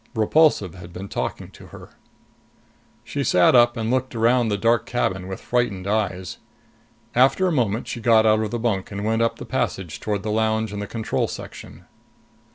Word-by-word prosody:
Repulsive 110 - +3
had 90 -1 -11
been 95 +3 -7
talking - - -4
to - - -14
her. - - -12 1.1
She - - -3
sat 90 -1 +4
up 120 -1 +5
and 115 0 -1
looked 130 -1 -1
around 120 +1 +3
the 105 -2 0
dark 115 +2 +1
cabin 95 -6 -1
with 95 0 -6
frightened 115 -7 -1
eyes. 100 -3 -2 0.7
After 135 +9 +3
a 180 - +2
moment, 115 -7 0
she 120 - -5
got 110 -1 +4
out 110 0 +4
of 110 - -2
the 120 - -3
bunk 110 -5 -1
and 100 +1 -4
went 115 +1 +1
up 115 - +1
the - - -8
passage 85 -5 -3
toward 105 -2 -3
the 105 - -2
lounge 110 0 0
and 105 - -4
the 100 - -5
control 110 0 -2
section. - - -10
110 Hz, 185 wpm, -22 LUFS, 100-120 Hz, 1.1 s, up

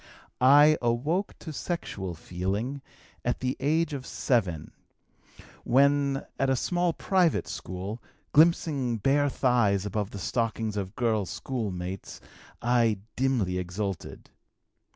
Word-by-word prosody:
"I 145 +4 +7
awoke 140 +12 0
to 160 - -8
sexual 100 - -4
feeling 100 - -3 0.4
at 120 - -1
the 130 +1 -1
age 155 +3 +1
of 130 -3 -5
7, 95 - 0 0.9
when, 140 +1 +3
at 135 - +2
a 135 - +3
small 175 +6 +1
private 180 -1 +1
school, 95 +5 -6 0.3
glimpsing 145 -6 +3
bare 140 +6 +2
thighs 115 -8 +2
above 105 0 -2
the 100 - -8
stockings 110 +1 -1
of 100 0 -4
girl 110 -5 0
schoolmates, 95 -8 -5 0.4
I 120 -3 +3 0.2
dimly 120 -9 +1
exulted. 90 0 -5
120 Hz, 110 wpm, -27 LUFS, 100-140 Hz, 0.9 s, I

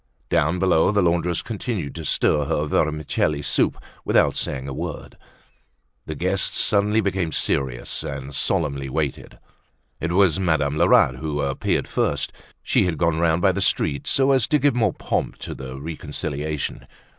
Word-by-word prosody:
Down 85 +1 +2
below 90 -3 +3
the 100 -1 +2
laundress 85 0 +1
continued 105 - -4
to 80 -1 -7
stir 75 -1 +2
her 75 +2 0
vermicelli 75 -1 0
soup 70 - +1 0.3
without - - +3
saying 65 0 -3
a 70 - -5
word. - - -6 0.9
The - - -4
guests - - 0
suddenly 105 +2 +3
became 95 -5 -1
serious 65 -4 -1
and 70 0 -6
solemnly 70 -2 -1
waited. 75 -1 -3 0.6
It 85 +1 -2
was 95 -3 +3
Madame 80 -6 +1
Lerat 65 -3 +4
who 75 0 -3
appeared 70 -1 -1
first. - - -1 0.3
She - - +2
had 85 -3 -2
gone 80 +1 +1
round 85 0 +2
by - - +5
the - - -3
street 70 -1 0
so 135 0 +3
as 130 -6 +3
to 150 - +3
give 145 -2 +2
more 110 -6 +1
pomp - - -2
to - - -5
the 65 0 -8
reconciliation. 75 -1 -4
80 Hz, 155 wpm, -23 LUFS, 70-90 Hz, 0.9 s, by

